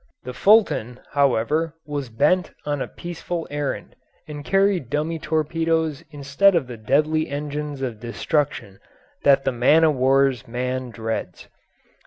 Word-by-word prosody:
The 125 - -6
Fulton, 130 - +3
however, 145 +4 +1
was 145 -4 -4
bent 150 +10 +2 0.2
on 145 -2 -2
a - - -2
peaceful 175 0 -6
errand, 145 -1 -4 0.3
and 150 -1 -7
carried 195 - +1
dummy 155 +4 -2
torpedoes 160 -1 -1
instead 145 +7 +2
of 165 -5 +1
the 125 -1 -8
deadly 150 +8 +1
engines 145 -1 -4
of 120 -5 -4
destruction 120 - -2 0.4
that 140 -1 +4
the 135 - +2
man 130 +7 +4
o' 155 - +4
war's 135 -1 +2
man 125 +2 -3
dreads. 110 -5 -5
145 Hz, 135 wpm, -22 LUFS, 125-160 Hz, 0.4 s, that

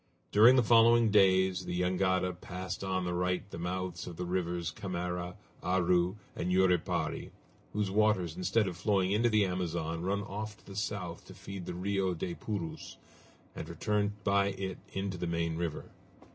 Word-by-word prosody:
During 115 +5 +8
the 125 - +5
following 115 0 +6
days 95 -2 +4
the 90 - -2
jangada 90 0 +1
passed 90 +1 -6
on 95 -1 -1
the 90 - -1
right 90 +2 -1
the - - -6
mouths 90 0 -3
of 85 -2 -7
the 90 - -3
rivers 90 -1 -1
Camara, 90 -2 -4 0.3
Aru, 90 0 +2 0.2
and 90 - -2
Yuripari, 90 -2 +1 0.4
whose 105 -2 -1
waters 100 -6 +2
instead 105 +3 +1
of 90 - -3
flowing 95 +1 +1
into 115 +4 +3
the 110 -2 +4
Amazon 85 -3 -2
run 100 +3 -1
off 105 +1 -6
to - - -24
the 100 - -10
south 100 -4 -4
to 95 - -12
feed 95 -1 -8
the - - -4
Rio 95 0 0
des 85 +1 -3
Purus, 95 -4 -5 0.6
and - - -6
return 105 -1 0
by 100 -1 +3
it 95 -2 -4
into 95 -2 -3
the 90 - -2
main 85 -1 -1
river. 85 -2 -4
95 Hz, 170 wpm, -31 LUFS, 90-100 Hz, 0.6 s, During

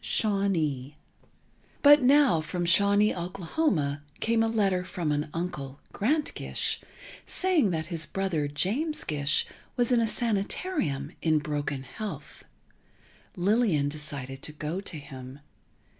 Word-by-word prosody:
XV - - -7
SHAWNEE 160 - 0 0.9
But 290 0 +8
now 265 - +5
from 175 +3 -3
Shawnee, 200 +4 +5
Oklahoma, 175 - -1 0.2
came 225 0 +2
a 225 - +3
letter 200 -5 +1
from 170 -4 -3
an 150 +1 -1
uncle, 150 -5 -5
Grant 290 +9 0
Gish, - - -2 0.4
saying 360 - +2
that 160 -3 -2
his 155 -2 -1
brother, 185 -7 -1
James 210 - -1
Gish, 145 -1 +1 0.3
was 245 0 +2
in 245 - +5
a 225 - +2
sanitarium, 200 - 0
in 160 -1 +3
broken 145 -2 -3
health. 155 - -7 0.9
Lillian 185 -6 +2
decided 140 -3 -5
to - - -5
go 155 +5 -4
to 185 -5 -5
him. 135 -2 -9
175 Hz, 130 wpm, -28 LUFS, 150-215 Hz, 0.9 s, But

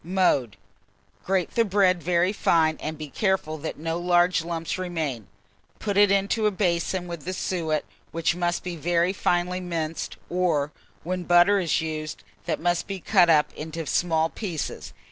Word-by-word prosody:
Mode. 155 - +1 0.7
Grate 190 -2 0
the 230 - +3
bread 190 -4 +2
very 175 +3 +2
fine, 160 -5 +2
and 155 0 -5
be 155 0 -6
careful 170 -2 -1
that 160 - -5
no 165 +2 -3
large 175 -1 +3
lumps 170 +1 -3
remain; 160 - -3 0.5
put 205 -2 -3
it 205 0 +6
into 200 +2 +2
a - - +4
basin 180 -2 -1
with 170 -2 -6
the 185 - -4
suet, 160 -5 -1 0.3
which 165 0 0
must 175 0 -1
be 180 -2 -4
very 170 +3 +1
finely 180 -1 0
minced, 165 -3 -4
or, 165 -5 0 0.3
when 180 +2 -2
butter 175 +3 +5
is 170 -2 +1
used, 155 -1 -5 0.2
that - - -1
must 175 +1 0
be 195 -1 -4
cut 180 -2 +4
up 150 -2 +4
into 160 +1 -6
small 160 0 +1
pieces. 175 -9 -5
175 Hz, 165 wpm, -25 LUFS, 160-185 Hz, 0.7 s, it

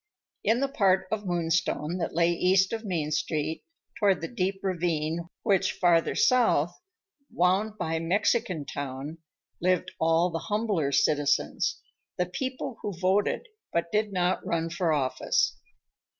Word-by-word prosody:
In 235 +3 +2
the 275 - +2
part 190 -8 +2
of 210 -2 -2
Moonstone 170 -1 0
that 165 - -3
lay 170 0 +3
east 185 +3 +3
of 225 0 -3
Main 165 -7 -2
Street, 155 +1 -1 0.4
toward 200 -3 +3
the 165 - -4
deep 195 -3 -2
ravine 170 -2 -1
which, 195 -3 +2
farther 170 -2 +2
south, 175 - +3 0.6
wound 195 +5 +1
by 160 -3 -1
Mexican 180 -2 0
Town, 140 +3 -6 0.4
lived 185 0 +1
all 165 +2 +3
the 165 - -2
humbler 205 -9 0
citizens, 145 - +1 0.4
the 180 - +1
people 255 +6 -4
who 200 -5 -4
voted 190 - +1 0.3
but 170 0 -1
did 215 0 +1
not 180 -1 0
run 165 0 -1
for 170 -1 0
office. 135 -4 +1
175 Hz, 135 wpm, -27 LUFS, 165-200 Hz, 0.6 s, lay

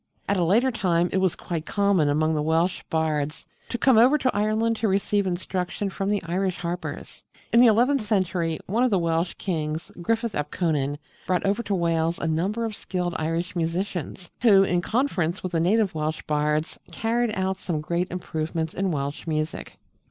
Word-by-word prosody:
At 200 - +1
a 180 - +2
later 230 +10 +3
time 175 -6 +1
it 190 - +2
was 190 -2 +1
quite 165 -3 -5
common 200 -7 +2
among 155 +2 +2
the 150 - 0
Welsh 165 +4 +1
bards 155 -2 -1 0.2
to 240 - -2
come 250 -2 +5
over 260 +6 +6
to 260 -3 0
Ireland 215 +2 +1
to 220 - 0
receive 200 0 +1
instruction 185 +2 -2
from 195 +1 -2
the 205 -3 0
Irish 180 +2 -1
harpers. 175 0 -5 0.3
In 235 - +7
the 245 - +8
eleventh 245 +5 +4
century 185 -6 0
one 225 +6 +1
of 255 - +4
the 200 - +2
Welsh 170 0 0
kings, 160 -3 -3
Griffith 230 +4 0
ap 150 - -2
Conan, 145 -5 0 0.3
brought 185 +1 +1
over 200 +4 +1
to 205 -4 -1
Wales 165 -1 +1
a - - -4
number 190 +9 0
of 220 -2 -4
skilled 180 -3 -3
Irish 165 +3 -2
musicians, 175 0 -3
who, 205 -5 +6
in 175 -2 +1
conference 195 - 0
with 185 - -3
the 165 - +1
native 195 +3 +2
Welsh 155 0 -2
bards, 150 +1 0
carried 235 +2 0
out 190 0 -1
some 175 -4 -3
great 170 +4 -1
improvements 160 -2 -3
in 195 0 -1
Welsh 145 0 -3
music. 155 0 -3
180 Hz, 185 wpm, -25 LUFS, 160-205 Hz, 0.3 s, the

